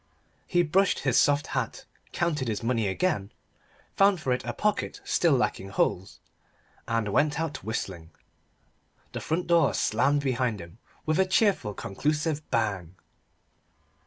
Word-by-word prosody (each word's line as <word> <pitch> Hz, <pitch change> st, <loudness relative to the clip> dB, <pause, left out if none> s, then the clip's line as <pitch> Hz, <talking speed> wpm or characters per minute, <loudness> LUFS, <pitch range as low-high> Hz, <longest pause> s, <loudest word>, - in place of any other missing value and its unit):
He 175 Hz, -1 st, +3 dB
brushed 190 Hz, +5 st, +2 dB
his 135 Hz, -3 st, +1 dB
soft 145 Hz, 0 st, +3 dB
hat -, -, -3 dB, 0.3 s
counted 150 Hz, -7 st, -1 dB
his 110 Hz, -1 st, -2 dB
money 115 Hz, -3 st, +1 dB
again 100 Hz, -, -1 dB, 0.6 s
found 195 Hz, -2 st, +4 dB
for 130 Hz, -5 st, 0 dB
it 125 Hz, -, -3 dB
a -, -, -3 dB
pocket 210 Hz, -1 st, -1 dB
still 170 Hz, -4 st, +2 dB
lacking 110 Hz, -6 st, 0 dB
holes 95 Hz, -2 st, -1 dB, 0.7 s
and 115 Hz, -2 st, 0 dB
went 145 Hz, +8 st, +1 dB
out 160 Hz, -2 st, -3 dB
whistling. 95 Hz, -7 st, -4 dB, 1.0 s
The -, -, -5 dB
front 165 Hz, +3 st, -1 dB
door 170 Hz, -1 st, +3 dB
slammed 140 Hz, +6 st, +2 dB
behind 125 Hz, -5 st, 0 dB
him 85 Hz, +5 st, -12 dB, 0.3 s
with 155 Hz, +3 st, +1 dB
a 190 Hz, -, +4 dB
cheerful 185 Hz, -, +2 dB
conclusive 150 Hz, -, -1 dB
bang. 100 Hz, -7 st, -1 dB
135 Hz, 135 wpm, -27 LUFS, 105-165 Hz, 1.0 s, found